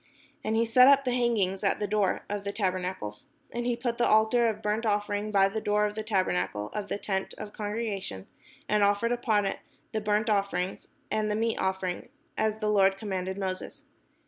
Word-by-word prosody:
And 220 +1 0
he 230 +1 +3
set 250 +3 +6
up 275 0 +6
the 250 - +1
hanging 230 -6 +1
at 195 - +1
the 210 - 0
door 205 -1 0
of 205 -1 -3
the 200 - -3
tabernacle. 185 - -2 0.3
And 240 0 -3
he 240 - +1
put 235 0 -3
the 240 - +3
altar 220 +2 +4
of 215 0 -5
burnt 210 +2 0
offering 205 -1 0
by 195 -2 +4
the 215 +3 -3
door 210 0 +2
of 210 - -2
the 220 - -4
tabernacle 105 - -1
of 205 -1 -3
the - - -2
tent 195 -2 -3
of 205 - -7
the - - -21
congre 215 +1 -2
gation, 95 - -7 0.4
and 210 0 +2
offered 205 +3 +2
upon 225 -4 +1
it - - -2 0.3
the 220 - -2
burnt 210 +1 +1
offering 195 -3 0 0.3
and 215 0 0
the 210 - 0
meat 225 +1 0
offering; 190 +1 -2 0.3
as 220 0 0
the 215 -1 0
Lord 195 -2 +4
commanded 190 -2 -3
Moses. 190 +9 -5
210 Hz, 205 wpm, -28 LUFS, 195-220 Hz, 0.4 s, set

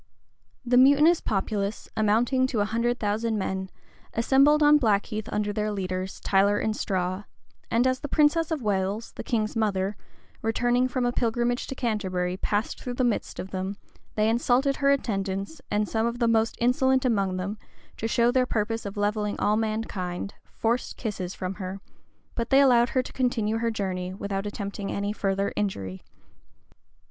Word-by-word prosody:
The 245 +1 +3
mutinous 285 +6 +6
populace, 200 0 -2
amounting 235 +5 +2
to 240 -4 -2
a 205 - +2
hundred 235 +3 0
thousand 220 +1 0
men, 190 -1 -3 0.5
assembled 275 +6 +4
on 295 0 +7
Blackheath 215 -2 0
under 210 0 -1
their 210 0 -1
leaders, 185 -1 -3
Tyler 200 +1 +3
and 215 +1 -1
Straw; 185 0 -2 0.4
and 235 +2 +2
as 255 0 +2
the - - -5
princess 305 +3 +3
of 310 -6 -2
Wales, 200 +2 -1
the - - -7
king's 220 -2 -1
mother, 205 -2 0 0.5
returning 245 +3 +2
from 255 -1 -1
a 245 - +2
pilgrimage 240 +1 0
to 270 - -5
Canterbury, 185 -7 -1
passed 205 +3 -2
through 250 -1 -4
the 255 - 0
midst 240 -3 -1
of 190 - -6
them, 190 +1 -3 0.4
they 215 0 +2
insulted 245 +4 +2
her 280 -1 +2
attendants, 200 0 -1
and 210 0 +1
some 225 +2 0
of 235 0 -3
the 235 -1 +2
most 225 0 +2
insolent 260 +2 +2
among 195 -6 +1
them, 200 +3 -4 0.4
to 225 - -2
show 235 +1 +3
their 255 0 +2
purpose 225 -1 -1
of 200 - -8
levelling 210 0 -1
all 210 - +2
mankind, 210 -4 -3 0.2
forced 235 +2 -1
kisses 195 -5 -4
from 185 0 -4
her; 190 +1 -5 0.5
but 235 0 -3
they 270 - +6
allowed 245 -3 +5
her 255 - +1
to - - -10
continue 225 -4 0
her 230 0 0
journey, 185 -4 -3
without 200 0 -3
attempting 200 -1 -5
any 200 +1 -2
further 195 -1 -1
injury. 95 - -3
220 Hz, 170 wpm, -26 LUFS, 200-245 Hz, 0.5 s, on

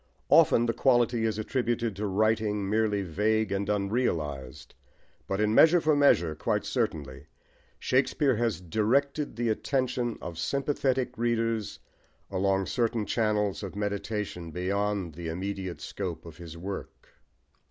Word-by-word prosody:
Often 120 - +6
the 115 - 0
quality 120 -3 +2
is 110 -1 0
attributed 115 -1 -1
to 105 +1 -2
writing 105 0 +1
merely 105 -1 +1
vague 105 +5 0
and 100 +1 -1
unrealised, 100 - -2 0.5
but 95 - -2
in 105 0 +2
Measure 165 +8 +7
for 155 -2 +2
Measure, 90 - +4
quite 75 - -1
certainly, 70 -2 -3 0.5
Shakespeare 130 +1 +2
has 115 -3 0
directed 130 - 0
the 120 0 -1
attention 125 0 -1
of 85 -2 -7
sympathetic 130 - 0
readers 115 -2 0 0.5
along 95 0 +1
certain 115 -2 0
channels 105 -3 0
of 100 -2 -6
meditation 105 -3 -3
beyond 95 +1 -1
the 85 +2 -7
immediate 95 +1 -4
scope 85 -5 -5
of 80 -1 -11
his 85 -2 -9
work. 95 +3 -7
105 Hz, 130 wpm, -28 LUFS, 95-120 Hz, 0.5 s, Measure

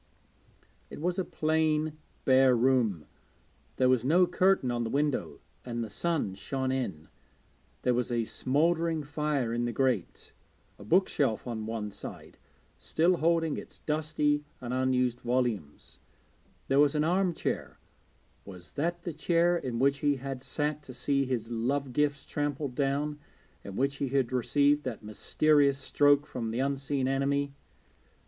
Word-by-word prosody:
It - - -9
was 180 +4 -1
a - - +1
plain 155 -1 0 0.3
bare 130 -1 +5
room; 115 - +2 0.7
there 130 - +3
was 125 -2 +3
no 170 +7 +5
curtain 185 -8 +2
on 120 -1 -1
the 115 - -3
window 145 +2 -1 0.2
and 120 -1 -3
the 110 - -7
sun 165 - -1
shone 130 +6 -3
in. 95 -13 -3 0.8
There 125 - +3
was 125 +1 -1
a 120 -1 +1
smouldering 160 +6 +1
fire 145 -4 -1
in 120 0 0
the 120 - -1
grate, 120 -6 -1 0.5
a - - -10
bookshelf 140 - +1
on 110 -3 -4
one 110 -2 -4
side, - - -9 0.4
still 175 +3 +2
holding 165 -1 +1
its - - -9
dusty 150 -1 0 0.2
and 125 0 -5
unused 125 -1 +1
volumes; 120 - -2 0.7
there 135 +1 +3
was 145 0 +4
an 150 - +2
arm 180 +3 +2
chair - - -3 0.7
was 90 -3 -11
that 170 +3 -2
the 170 - -4
chair 170 +3 +2
in 130 -8 -3
which 140 +3 +2
he 145 -1 +2
had 135 -1 -6
sat 150 +3 -2
to 130 -4 -11
see 140 +1 +1
his 120 -3 -3
love 130 +3 -1
gifts 145 0 0
trampled 145 -2 -2
down, 145 +2 -1 0.4
in 100 - -8
which 140 +3 0
he 140 - -1
had 130 -2 0
received 145 +4 +3
that 115 -4 -5
mysterious 140 +6 +2
stroke 145 +1 +3
from 115 -5 -4
the 115 - -3
unseen 135 0 -1
enemy? 140 +1 0
135 Hz, 150 wpm, -29 LUFS, 125-150 Hz, 0.8 s, bare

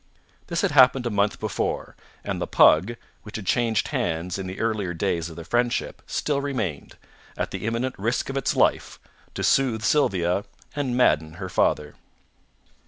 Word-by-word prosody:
This 170 -1 -1
had - - +1
happened 130 -2 +5
a 120 - -1
month 100 0 +1
before, - - -3 0.3
and - - -3
the - - -2
pug, 95 +10 +5 0.3
which 105 - -11
had 110 - -5
changed 115 0 +1
hands 85 +3 -2
in 95 - -4
the 95 - -7
earlier 105 -6 -1
days 85 -2 -1
of 80 - -10
the 85 - -8
friendship, 120 +5 -1
still 140 -2 -1
remained, 115 - -4 0.4
at - - -2
the - - -4
imminent 120 +3 -1
risk 115 +5 -1
of 135 - -5
its 135 - 0
life, - - +1 0.4
to - - -3
soothe 120 -5 +2
Sylvia 100 - +2 0.3
and 135 -4 -1
madden 80 -10 +3
her 95 +2 -6
father. 75 -3 +1
110 Hz, 170 wpm, -24 LUFS, 90-125 Hz, 0.4 s, happened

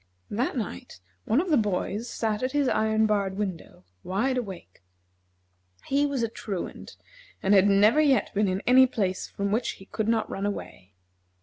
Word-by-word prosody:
That 245 +5 -1
night 95 - -6 0.3
one 230 - +2
of 355 +1 -1
the 300 - +5
boys 210 +2 -1
sat 215 -2 -2
at 255 +1 -2
his 290 -2 +2
iron 220 -1 +2
barred 200 -3 0
window, 185 - -5 0.2
wide 225 +8 0
awake. 190 - -6 1.0
He 285 +2 +2
was 275 -4 -2
a - - +2
Truant, 205 -4 -6 0.5
and 195 - +3
had 195 0 +6
never 205 +8 +5
yet 280 -4 +2
been 205 0 +2
in 185 +1 -1
any 260 +1 +7
place 195 -7 -2
from 200 0 -3
which 225 +4 0
he 195 - -14
could 220 +1 -3
not 225 -1 +1
run 195 +1 -3
away. 95 - -7
215 Hz, 175 wpm, -26 LUFS, 195-250 Hz, 1.0 s, any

